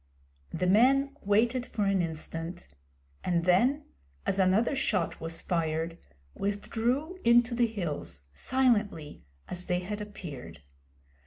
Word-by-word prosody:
The 180 - -2
men 270 +8 +4
waited 230 +5 +2
for 210 - -1
an 195 -2 +2
instant, 165 - -5 0.6
and 170 -2 +1
then, 250 +12 +3 0.4
as 195 - 0
another 195 +8 +3
shot 185 -9 0
was 165 0 -4
fired, 165 -1 -1 0.3
withdrew 240 - -1
into 240 +1 +5
the 235 0 +3
hills, 150 - -4
silently 210 - +1 0.3
as 180 0 -5
they 180 0 +1
had 205 +3 -4
appeared. 180 - -8
200 Hz, 115 wpm, -29 LUFS, 170-240 Hz, 0.6 s, into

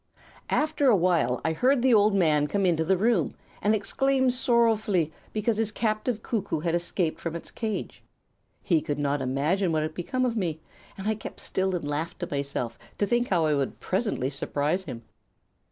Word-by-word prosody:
After 300 -2 +1
awhile 170 - +3
I 160 - +2
heard 255 - +2
the 260 -2 +5
old 210 -1 +5
man 155 -5 +3
come 200 +4 0
into 165 -3 +2
the 190 +3 +2
room 210 -5 +1 0.3
and 210 +1 +3
exclaim 260 +5 +1
sorrowfully 225 - +2 0.2
because 215 +1 0
his 220 -1 0
captive 215 +1 -1
cuckoo 205 -9 -2
had 165 0 0
escaped 175 -1 -1
from 165 -1 -3
its 170 - -7
cage. 220 -2 -4 0.6
He 165 -4 +2
could 145 -2 -3
not 145 -1 0
imagine 150 +9 +1
what 155 -1 +1
had 155 0 -3
become 255 - -1
of 240 -2 -1
me, 170 -7 -1 0.4
and 195 +1 -5
I 220 - +3
kept 215 - -8
still 190 0 -1
and 165 -4 -3
laughed 155 +4 -3
to 175 - -2
myself 140 -4 -3 0.2
to 205 - +2
think 240 +3 +1
how 170 -4 +2
I 155 - +2
would 140 -2 -1
presently 190 - -1
surprise 145 +6 -1
him. 115 -7 -7
185 Hz, 185 wpm, -27 LUFS, 155-220 Hz, 0.6 s, the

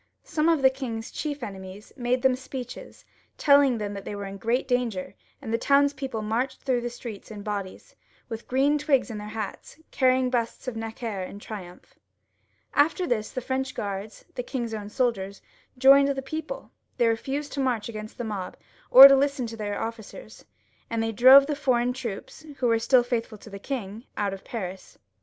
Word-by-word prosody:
Some 310 +1 +1
of 320 -5 +2
the 265 - +7
king's 235 -4 -5
chief 290 -3 -4
enemies 190 0 -9
made 250 0 -1
them 260 -1 +4
speeches, 255 -1 -8 0.3
telling 280 -4 +5
them 205 -1 -4
they 200 +1 -6
were 200 0 -5
in 195 0 -7
great 240 +6 0
danger, 245 -7 -1 0.3
and 225 - -5
the 230 - +1
townspeople 280 -5 +1
marched 230 +5 -2
through 255 -3 +1
the 240 - -3
streets 235 -3 -9
in 210 -2 -8
bodies, 200 -3 -6 0.3
with 225 -1 -7
green 275 +3 +2
boughs 285 -5 +1
in 215 - -5
their 210 - -7
hats, 215 +4 -6
carrying 255 -1 +2
busts 235 +1 -2
of 250 - -3
Necker 225 -2 -4
in 185 +2 -7
triumph. 195 -4 -10 0.8
After 325 +5 +3
this 220 -8 -1
the 255 - -4
French 260 +1 -3
Guards, 200 +1 -5
the - - -3
king's 240 -2 -4
own 205 -2 -5
soldiers, 205 -5 -1 0.4
joined 275 +2 +7
the 275 -1 -1
people; 315 - -6 0.3
they 240 - +3
refased 270 +6 -2
to 280 - -4
march 250 -5 0
agaiost 215 -2 -7
the 240 - -4
mob, 205 -5 -5 0.3
or 265 +2 +12
to 275 - +6
listen 275 -1 +1
to 230 0 -6
their 205 -2 -3
ofScers, 230 - -8 0.4
and 230 -1 -1
they 225 - -1
drove 260 +5 +8
the 295 0 -2
foreign 250 -3 +1
troops, 240 -6 -7 0.2
who 255 - -1
were 230 -1 +3
still 245 +2 +4
faithful 235 -3 -3
to 215 - -14
the 200 - -7
king, 225 -2 -5
out 200 -1 0
of 195 - -9
Paris. 190 -5 -7
240 Hz, 185 wpm, -26 LUFS, 215-265 Hz, 0.8 s, or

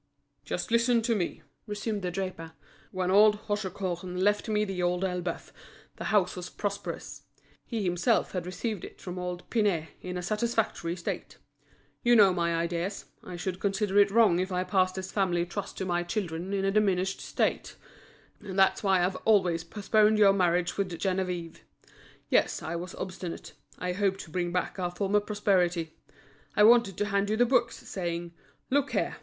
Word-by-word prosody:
"Just - - -4
listen 235 0 +3
to 230 0 +2
me," 180 -5 -3 0.2
resumed 210 0 -3
the 180 - -2
draper. 180 -3 -5 0.4
"When 185 -1 -1
old 210 +2 +6
Hauchecorne 185 -3 -3
left 205 +3 +1
me 210 0 +2
The 190 -3 -3
Old 175 +1 0
Elbeuf, 180 -2 -4 0.4
the - - -6
house 205 -4 +2
was 180 -1 -6
prosperous; 200 -1 -5 0.5
he 225 -4 -2
himself 180 +6 +1
had 180 -2 -4
received 200 +2 -4
it - - -10
from 180 0 -6
old 180 0 -5
Pinet 195 -9 +1
in 180 0 -5
a 180 - -4
satisfactory 215 -4 -1
state. 170 - -5 0.6
You 240 0 +5
know 200 -4 +7
my 170 -1 0
ideas; 170 +4 -2 0.2
I 180 - -7
should 180 +1 -4
consider 200 0 +1
it 200 0 +6
wrong 205 -5 +4
if 185 +1 -2
I 180 0 0
passed 185 0 +1
this 190 0 -5
family 175 -4 +1
trust 200 +3 -6
to 190 - -2
my 175 -1 0
children 175 -1 -3
in 195 -1 0
a 195 - +2
diminished 195 -2 +1
state; - - -1 0.6
and 195 -2 -7
that's 190 0 +4
why 190 -3 +3
I've 185 +1 -2
always 185 -6 +2
postponed 210 +4 +2
your 200 -2 +6
marriage 180 -2 +1
with 200 -2 0
Geneviève. 180 -2 -2 0.7
Yes, - - +2
I 160 +2 -3
was 175 +2 -6
obstinate; 185 -2 -6 0.2
I 180 - -2
hoped 195 0 0
to 160 - -12
bring 175 0 -1
back 180 +2 -2
our 180 -1 0
former 200 +3 +1
prosperity; 185 -6 0 0.6
I 210 - +6
wanted 230 -4 +5
to 205 - 0
hand 200 0 0
you 215 - +1
the 245 - +5
books, 240 -1 0
saying: 170 -2 -4 0.4
'Look 285 +1 +1
here! - - -1
190 Hz, 175 wpm, -28 LUFS, 180-210 Hz, 0.7 s, know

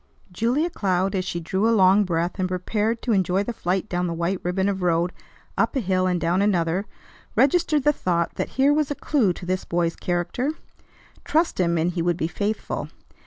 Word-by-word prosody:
Julia 245 - 0
Cloud, 190 - 0
as 185 -2 -1
she 175 - -3
drew 190 +6 0
a 230 - +3
long 195 +2 +5
breath 175 +2 -1
and 185 - +1
prepared, 210 +5 -1
to 245 - 0
enjoy 190 -1 +2
the 240 - -4
flight 190 0 -1
down 180 -2 -1
the 170 - -3
white 170 +3 -1
ribbon 190 +2 0
of 195 -2 -1
road, 175 0 +1 0.5
up - - +1
a - - +2
hill 185 -4 +1
and 180 -1 +1
down 170 +3 +1
another, 185 -1 +1 0.5
registered 295 +3 +3
the 295 +1 +4
thought 170 - -1
that - - -3
here 275 +2 +5
was 300 -1 +1
a 290 - -2
clew 260 -12 +1
to 175 - -9
this 185 +1 -1
boy's 170 -1 -1
character. 180 - -2 0.7
Trust 325 - +1
him, 170 -2 +2
and 165 +2 +1
he 175 -1 -2
would 175 0 +1
be 160 - -1
faithful. 205 +5 -3
185 Hz, 205 wpm, -24 LUFS, 175-220 Hz, 0.7 s, long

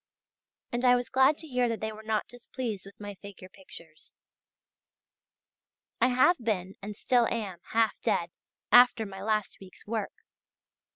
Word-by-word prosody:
And 240 +1 -2
I 250 -1 +6
was 245 -1 -2
glad 265 +3 +4
to 320 - -8
hear 250 -3 +1
that 230 - -2
they 220 0 -3
were 215 0 -10
not 220 -1 -1
displeased 240 -4 -6
with 200 - -15
my 205 -1 -7
figure 200 -2 -11
pictures. 175 -5 -13 1.9
I 245 - +6
have 255 +8 +4
been 195 -5 -2
and 205 +1 -7
still 240 +1 +2
am 200 -7 -4
half 225 -1 +3
dead, 170 0 0 0.4
after 245 -2 +6
my 195 -1 -9
last 215 0 -1
week's 185 -1 -14
work. 215 -1 -3
220 Hz, 155 wpm, -28 LUFS, 200-245 Hz, 1.9 s, I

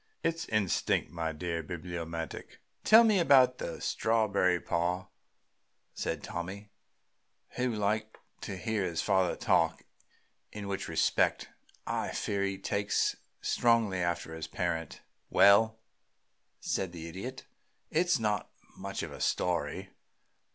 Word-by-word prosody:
It's 165 0 -1
instinct, 110 -4 +1
my 80 -2 -2
dear 85 +1 -3
Bibliomaniac." 85 -1 -6 0.3
"Tell 225 +1 +8
about 130 -6 +5
the - - -5
strawberry, 100 -5 +2
pa," 90 +3 -1 0.8
said - - -3
Tommy, 100 +4 -6 0.8
who 125 0 -1
liked 110 0 -1 0.2
to 95 - -5
hear 110 +1 -1
his 85 -3 -1
father 95 -3 +2
talk, - - +1 0.7
in 105 -1 -6
which 100 -1 -3
respect - - +1 0.4
I - - -2
fear 100 -1 -1
he 100 0 -1
takes 100 +1 0 0.3
strongly 115 -5 +2
after 85 -2 -2
his 80 -1 -5
parent. 85 -3 -3 0.3
"Well," 110 +3 +6 0.8
said 95 -2 -2
the 85 -1 -7
Idiot, 100 +10 -7 0.5
"it's 170 +1 +3
not 105 -3 -1 0.3
much - - -5
of - - -5
a - - -9
story. 90 +2 -1
95 Hz, 115 wpm, -31 LUFS, 85-110 Hz, 0.8 s, Tell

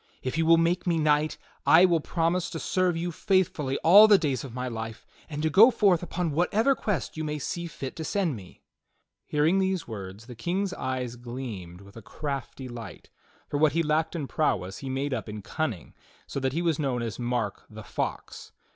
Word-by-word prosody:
If 130 - -2
you 160 0 +1
will 165 0 +7
make 170 +2 +1
me 170 -1 +2
knight 150 0 +2 0.3
I 170 +3 +7
will 170 -3 +3
promise 170 +3 0
to 165 - -5
serve 180 -1 +1
you 175 +1 -2
faithfully 165 -7 0
all 200 +6 +9
the 210 -2 +7
days 140 -8 -1
of 135 - -8
my 125 +2 -4
life, 110 -2 -6 0.2
and 150 -1 -4
to 160 - +2
go 215 - +8
forth 200 -8 +3
upon 175 -2 -2
whatever 210 - +2
quests 205 -10 -3
you 155 - -2
may 150 -1 -2
see 170 +4 -4
fit 135 -5 -7
to 160 - -4
send 180 - 0
me." 95 -4 -13 0.6
Hearing 155 +6 +2
these 190 -3 0
words, 100 -1 -8
the 125 - -9
King's 180 - -2
eyes 125 -2 -3
gleamed 115 -8 -7
with 100 0 -16
a 115 - -9
crafty 135 +3 -5
light, 120 -2 -9 0.4
for 145 - -2
what 155 -2 +4
he 165 +1 +2
lacked 155 +2 0
in 155 -4 -2
prowess 95 - -1
he 135 - -6
made 135 +1 -2
up 115 -3 -4
in 105 -1 -7
cunning, 125 - -4 0.3
so - - -4
that 130 -1 -1
he 170 +3 -1
was 165 -3 +1
known 130 -5 -1
as 115 -1 -5
Mark 120 -4 -2
the 110 0 -10
Fox. - - -5
150 Hz, 205 wpm, -27 LUFS, 125-170 Hz, 0.6 s, all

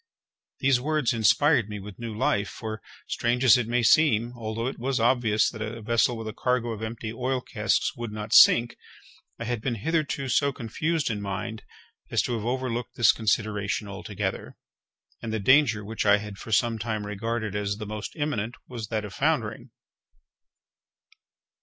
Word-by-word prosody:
These 135 -2 +3
words 150 -3 +1
inspired 115 +1 +3
me 105 -1 -5
with 100 +2 -10
new 115 -2 -5
life; 105 -4 +1
for, 110 -1 -6 0.2
strange 120 +2 -1
as 130 - +8
it 125 -3 0
may 120 +1 +1
seem, 120 -4 +4
although 115 0 -4
it 130 - -4
was 130 +1 -1
obvious 115 -2 +3
that 110 - -9
a 110 +2 -4
vessel 115 +2 +2
with 115 -1 -6
a 110 - -5
cargo 125 0 0
of 110 -1 -6
empty 110 0 -5
oil 130 +2 -1
casks - - 0
would 120 -2 -5
not 105 +1 -5
sink, 120 0 +7 0.6
I - - -5
had 120 -1 -2
been 120 0 -1
hitherto 140 +2 -1
so 140 +3 +2
confused 150 +5 -2
in 105 -2 -3
mind 105 +3 -4 0.5
as - - +1
to 125 - -2
have 110 -2 -3
overlooked 125 -1 -2
this 120 -4 +6
consideration 105 -2 -1
altogether; 100 -1 -5 0.6
and 115 - -4
the 110 - -1
danger 120 -2 +4
which 110 +2 -3
I 105 0 +5
had 105 -1 -8
for 110 - -9
some 115 +1 +2
time 110 -1 -3
regarded 110 0 -3
as 100 -1 -1
the 105 - -6
most 105 +1 -6
imminent 125 -7 -2
was 115 -4 -6
that 110 -2 -2
of 100 - -9
foundering. - - -1
115 Hz, 175 wpm, -26 LUFS, 105-125 Hz, 0.6 s, as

